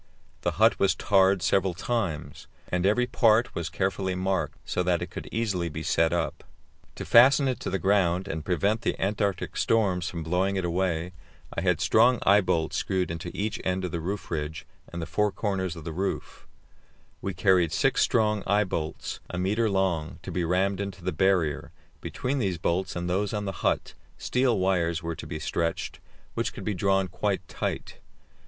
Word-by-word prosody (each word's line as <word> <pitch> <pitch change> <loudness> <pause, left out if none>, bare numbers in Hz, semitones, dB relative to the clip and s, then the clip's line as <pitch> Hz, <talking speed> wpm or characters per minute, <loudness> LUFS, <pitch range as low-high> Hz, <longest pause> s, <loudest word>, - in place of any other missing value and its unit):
The - - 0
hut - - +4
was 100 - +3
tarred 95 -2 +3
several 95 0 +2
times, 100 -7 -3 0.2
and 90 +1 +1
every 125 +5 +3
part 120 -1 +3
was 85 -1 -3
carefully 95 -1 -1
marked, 95 +1 -1
so - - -1
that 90 -1 +1
it - - -8
could - - -7
easily 100 -7 -1
be 80 +1 -6
set 80 +1 +2
up. 85 -1 -2 0.5
To - - -6
fasten 135 +4 +6
it 130 - -1
to - - -4
the 95 - 0
ground 95 -2 +2
and 80 0 -4
prevent 100 +6 +1
the - - -1
Antarctic 100 -1 -1
storms 95 -6 +1
from 85 -2 -5
blowing 90 +4 0
it 95 -2 -1
away 85 0 -1 0.4
I - - -2
had 90 -3 +2
strong 115 +5 +5
eyebolts 95 -5 +3
screwed 95 -3 -1
into 80 +1 -5
each 110 +3 -2
end 95 0 -1
of 90 - -4
the 85 - -2
roof 95 +5 -4
ridge 75 -1 -3 0.3
and 85 -1 -4
the - - -3
four 105 +6 +1
corners 95 -5 -2
of 80 - -9
the 80 0 -5
roof; 95 +4 -4 0.7
we 95 -2 -3
carried 95 -3 +3
six - - +2
strong 105 -2 +2
eyebolts, 95 -6 -1
a 90 - -5
metre 105 +5 +1
long, 95 -5 0
to - - -6
be 90 - -1
rammed 95 +3 +1
into 95 -3 -6
the - - -1
barrier; 85 -3 +1 0.3
between 135 +2 -2
these 95 -7 0
bolts 95 +3 -1
and 85 0 -3
those 100 +4 0
on 105 0 -2
the 95 - -2
hut, - - 0 0.2
steel 125 -3 +1
wires 85 -3 +1
were 85 0 -3
to 75 - -8
be 80 - -4
stretched, 85 +1 -2 0.3
which - - -2
could - - -8
be 105 - -1
drawn 95 +1 +1
quite - - -2
tight. - - -4
95 Hz, 185 wpm, -27 LUFS, 85-100 Hz, 0.7 s, fasten